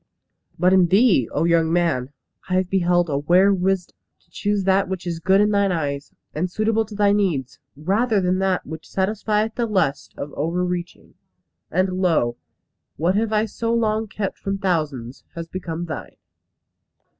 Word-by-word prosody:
"But 180 +2 +3
in 185 -2 +5
thee, 195 - +4
O 150 - 0
young 165 -1 +3
man! 165 -7 +1 0.4
I 185 - +1
have 185 -1 0
beheld 175 -2 +2
a 140 -3 -1
rare 190 +3 +5
wisdom. 190 -1 -1 0.3
To 170 - -36
choose 205 +2 -1
that 190 0 +2
which 190 -1 -4
is 170 -2 -3
good 190 +4 +3
in 210 0 +3
thine 200 -1 +2
eyes, 145 -4 -3 0.2
and 175 +4 -1
suitable 220 +3 0
to 210 - -10
thy 205 -1 +3
needs, 180 -11 0 0.2
rather 205 +8 +1
than 185 0 +1
that 190 -1 0
which 160 0 -9
satisfieth 210 +2 0
the 235 0 -1
lust 155 -10 -1
of 145 - -6
over 170 +5 -1
reaching; 180 -1 -5 0.6
and 185 +1 0
lo! 155 -10 +2 0.6
what 170 +4 +1
I - - 0
have 215 0 +1
so 230 0 -2
long 220 -1 0
kept 200 -1 -4
from 195 0 -2
thousands, 150 - -2
has 165 -1 -5
become 170 -1 -5
thine!" 155 -10 -7
185 Hz, 170 wpm, -22 LUFS, 165-200 Hz, 0.6 s, in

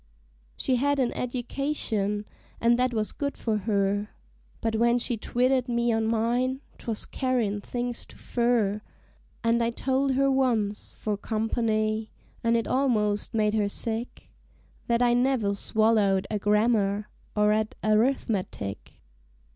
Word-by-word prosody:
She 255 - +2
had 285 +3 +1
an 255 -3 +1
edication, 240 -5 -2 0.3
an' 235 +1 +4
that 250 0 +2
was 215 -2 -1
good 280 -1 -3
for 220 -2 -1
her; 205 0 +1 0.5
But 225 -1 -1
when 235 +1 +3
she 245 0 -1
twitted 250 +3 +1
me 235 0 +1
on 225 0 +1
mine, 240 +4 0 0.2
'twas 225 -2 -2
carryin' 235 -6 -1
things 245 +2 -4
too - - -15
fur; 235 -4 +1 0.6
An' 230 +1 +3
I 230 - +2
told 265 +3 0
her 275 +1 +3
once, 230 -6 0
'fore 210 -2 -2
company 215 0 -1 0.3
(an' 230 0 +3
it 230 - +1
almost 215 -6 +1
made 215 -1 +2
her 210 -2 +1
sick), 225 +3 -3 0.6
That 235 +1 +2
I 240 -1 +4
never 245 -5 +2
swallowed 205 -2 +2
a 210 - 0
grammar, 210 -1 +2 0.3
or 210 0 +4
'et 215 0 -1
a 215 - +1
rithmetic. 210 - 0
230 Hz, 140 wpm, -27 LUFS, 210-245 Hz, 0.6 s, an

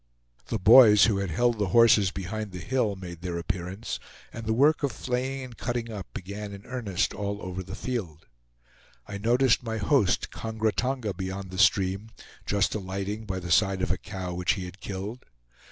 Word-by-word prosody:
The 115 - -1
boys, 105 +1 +8
who 110 -4 +2
had 100 -2 -2
held 120 +6 +1
the 100 - +1
horses 110 -4 +6
behind 100 +2 -5
the - - -5
hill, 115 0 0
made 90 -3 -9
their 90 -1 -3
appearance, 95 +5 -4 0.3
and 115 -1 -7
the - - +1
work 145 +6 +4
of 140 -3 0
flaying 130 +2 -3
and 125 -2 -9
cutting 120 -1 -3
up 100 -4 -6
began 100 +2 -6
in 100 0 -10
earnest 110 -8 -1
all 100 0 -3
over 95 -1 -5
the 95 +2 -7
field. 95 -12 -4 0.8
I 100 -1 -6
noticed 120 +3 +3
my 115 -2 -3
host 105 -1 +2
Kongra 110 -1 -1
Tonga 125 -5 -1
beyond 95 +1 -5
the 95 - -5
stream, 95 +2 +3 0.4
just 100 0 +1
alighting 100 +2 -4
by 95 -1 -2
the 90 -1 -6
side 95 +1 +3
of - - 0
a 95 - +1
cow 95 -3 -6
which 90 0 +1
he 95 -3 -5
had 90 +2 -11
killed. 100 +6 -6
100 Hz, 185 wpm, -27 LUFS, 95-115 Hz, 0.8 s, boys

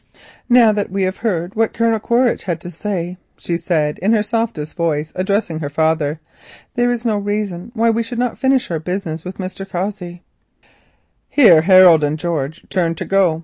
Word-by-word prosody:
"Now 240 -3 +6
that 205 -1 -2
we 195 +1 -1
have 185 +1 -1
heard 185 -5 -2
what 225 0 0
Colonel 230 -1 +1
Quaritch 240 +3 +1
had 170 -4 -2
to 175 - -8
say," 180 0 -4 0.2
she 170 - -3
said 160 -3 -1
in 205 +5 +2
her 215 -2 +2
softest 220 -9 -3
voice, 155 -2 -1
and 185 - -4
addressing 190 -4 -1
her 145 -3 -4
father, 155 0 0 0.5
"there 245 0 +1
is 245 0 -2
no 215 -3 +1
reason 205 -2 -3
why 230 0 +3
we 230 +1 0
should 230 +1 -5
not 245 -1 -2
finish 265 -6 +1
our 165 - -1
business 165 -2 -4
with 185 +1 -8
Mr. 185 0 -6
Cossey." 180 -2 -5 1.1
Here 195 - +6
Harold 180 -3 +6
and 150 +1 0
George 160 -1 -4
turned 165 -3 0
to - - -4
go. 185 -5 +2
185 Hz, 190 wpm, -18 LUFS, 165-220 Hz, 1.1 s, Now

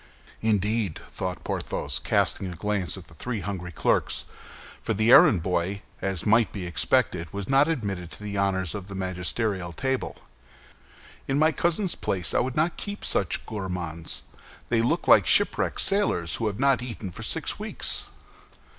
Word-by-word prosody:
"Indeed!" 105 -3 +1
thought - - -4
Porthos, - - -2
casting 95 -2 +1
a - - -7
glance 100 0 -1
at 90 - -10
the - - -16
three 115 +5 -4
hungry 90 -3 -5
clerks—for 110 +6 -2
the 110 +3 +3
errand 90 -9 +7
boy, 95 +3 -1 0.2
as 95 -4 -2
might 110 +1 +4
be 95 -4 -5
expected, 85 0 0
was 100 -1 -5
not 135 +2 +4
admitted 100 - -2
to 105 - -10
the 105 -1 -4
honors 95 -3 0
of 100 -2 -6
the 100 - -7
magisterial 95 0 -2
table, 130 +6 -2 1.1
"in 135 - +1
my 155 +2 +4
cousin's 170 +3 0
place, 90 -3 -2
I - - +3
would 130 0 -1
not 160 +3 +1
keep 205 0 -6
such 95 - 0
gourmands! 90 -6 -4 0.5
They 115 -1 +3
look 115 - 0
like - - +7
shipwrecked - - +3
sailors 140 - +1
who 115 - -1
have 100 -1 -3
not 135 -2 +3
eaten 110 -6 -6
for - - -9
six - - 0
weeks." - - 0
100 Hz, 160 wpm, -26 LUFS, 90-120 Hz, 1.1 s, errand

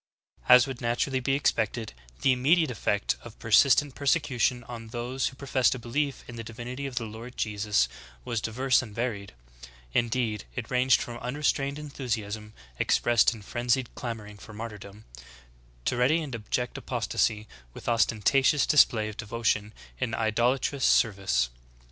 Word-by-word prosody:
2. - - +9
As 125 +1 +8
would 135 -3 -7
naturally 120 +3 0
be 135 +2 0
expected, 115 - 0 0.3
the 135 - +5
immediate 145 +4 +3
effect 105 -2 0
of 120 -2 -12
persistent 135 +5 +4
persecution 130 -4 +1
on 115 -1 -8
those 120 +3 -2
who 135 - -7
professed 130 -2 +1
a - - -4
belief 135 +3 -2
in 120 - -9
the 115 - -5
divinity 125 +5 -6
of 130 - -8
the 115 - -1
Lord 115 +3 -9
Jesus 105 - +1 0.4
was 115 -2 -2
diverse 125 +3 +2
and 110 -5 -10
varied; 110 -5 -3 0.6
in 120 -1 +2
deed 110 -4 -1
it 120 -1 -5
ranged 125 +1 +3
from 120 -1 -7
unrestrained 140 +2 -1
enthusiasm 110 -8 -4 0.3
expressed 120 -1 +3
in 105 - -12
frenzied 120 +3 -1
clamoring 105 -4 -6
for 105 - -12
martyrdom, 105 -1 -9 0.8
to - - +1
ready 130 +7 +3
and 140 -4 -7
abject 120 +2 -3
apos - - -3
tasy 105 0 +1 0.3
with - - -10
ostentatious 120 +5 +3
display 115 -7 +4
of 110 0 -8
devotion 110 -2 -1 0.3
in 110 - -1
idolatrous 120 +5 0
ser 115 - +5
vice. 95 -11 0
120 Hz, 155 wpm, -27 LUFS, 110-130 Hz, 0.8 s, 2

